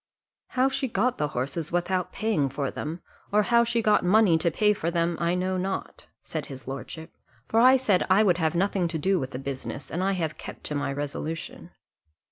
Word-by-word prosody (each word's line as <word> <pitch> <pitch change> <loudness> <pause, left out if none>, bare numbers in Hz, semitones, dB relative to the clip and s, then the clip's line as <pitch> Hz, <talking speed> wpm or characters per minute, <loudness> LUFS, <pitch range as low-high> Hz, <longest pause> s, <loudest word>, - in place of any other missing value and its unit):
"How 255 +1 +5
she 270 0 -1
got 235 +2 0
the 150 - +1
horses 140 +4 -3
without 175 +1 0
paying 200 -10 0
for 140 0 -3
them, 165 +3 -5 0.3
or 210 +1 +4
how 235 +2 +4
she 235 -1 0
got 210 -1 +4
money 190 -1 +5
to 170 - +2
pay 210 +5 +3
for 170 -4 -2
them, 170 0 0
I 170 +1 +1
know 185 +1 -1
not," 190 +1 -4 0.2
said 155 -3 -5
his 130 -3 -9
lordship; 160 +4 -7 0.3
"for 225 - +2
I 255 +3 +7
said 210 -8 +1
I 195 +3 +5
would 180 -4 +3
have 160 0 +1
nothing 190 0 +1
to 165 - -3
do 190 +4 +1
with 130 - -3
the 125 - -6
business, 135 +1 -6
and 175 +3 -1
I 195 +1 +1
have 165 -4 -3
kept - - -9
to - - -3
my 145 -1 -1
resolution." 145 +3 -5
175 Hz, 210 wpm, -26 LUFS, 150-205 Hz, 0.3 s, I